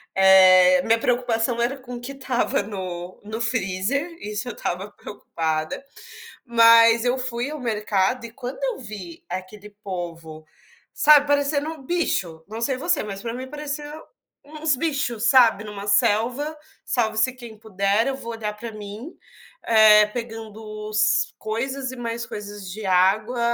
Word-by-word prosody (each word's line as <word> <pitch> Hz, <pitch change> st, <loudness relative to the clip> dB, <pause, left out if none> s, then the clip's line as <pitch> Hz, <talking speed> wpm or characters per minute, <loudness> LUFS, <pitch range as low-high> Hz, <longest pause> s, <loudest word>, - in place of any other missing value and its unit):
eh, 185 Hz, -1 st, +7 dB
minha 225 Hz, 0 st, +4 dB
preocupação 235 Hz, 0 st, 0 dB
era 240 Hz, +3 st, 0 dB
com 250 Hz, -2 st, -9 dB
o -, -, -6 dB
que 245 Hz, +3 st, -7 dB
estava 260 Hz, -5 st, -1 dB
no 185 Hz, -3 st, -7 dB
no 220 Hz, +2 st, -5 dB
freezer, 230 Hz, -, -1 dB
isso 210 Hz, +2 st, -5 dB
eu 240 Hz, -, -4 dB
estava 190 Hz, +2 st, -4 dB
preocupada, 160 Hz, -3 st, -4 dB, 0.6 s
mas 230 Hz, -1 st, +6 dB
eu 245 Hz, +1 st, +1 dB
fui 250 Hz, 0 st, -3 dB
ao 305 Hz, 0 st, -6 dB
mercado, 215 Hz, 0 st, 0 dB
e -, -, -8 dB
quando 250 Hz, +2 st, -7 dB
eu -, -, -1 dB
vi 200 Hz, -8 st, -9 dB
aquele 185 Hz, +3 st, -7 dB
povo, 165 Hz, -4 st, -7 dB, 0.5 s
sabe, 295 Hz, -1 st, +6 dB
parecendo 285 Hz, +1 st, +1 dB
um 320 Hz, -3 st, -8 dB
bicho, 190 Hz, -, -2 dB
não 220 Hz, +3 st, -7 dB
sei 255 Hz, +3 st, 0 dB
você, 330 Hz, +7 st, 0 dB
mas 200 Hz, -2 st, -6 dB
pra 230 Hz, +1 st, -4 dB
mim 255 Hz, +2 st, -6 dB
pareceu 295 Hz, 0 st, -5 dB, 0.5 s
uns 305 Hz, 0 st, -1 dB
bichos, 250 Hz, -6 st, -1 dB
sabe, 235 Hz, -6 st, +5 dB
numa 205 Hz, -1 st, -8 dB
selva, 245 Hz, +9 st, +1 dB, 0.3 s
salve-se 220 Hz, 0 st, +1 dB
quem 240 Hz, -4 st, -11 dB
puder, 205 Hz, +1 st, 0 dB
eu 270 Hz, -, -1 dB
vou 235 Hz, -3 st, -7 dB
olhar 220 Hz, -2 st, -4 dB
pra 230 Hz, +1 st, -7 dB
mim, 215 Hz, -, -9 dB, 0.5 s
eh, 215 Hz, -2 st, +7 dB
pegando 225 Hz, -1 st, -7 dB, 0.3 s
os 215 Hz, 0 st, +1 dB
coisas 260 Hz, +5 st, -3 dB
e -, -, -8 dB
mais 235 Hz, -1 st, -4 dB
coisas 205 Hz, -1 st, -8 dB
de 215 Hz, +3 st, -7 dB
água, 195 Hz, +6 st, +2 dB
225 Hz, 150 wpm, -23 LUFS, 205-255 Hz, 0.6 s, eh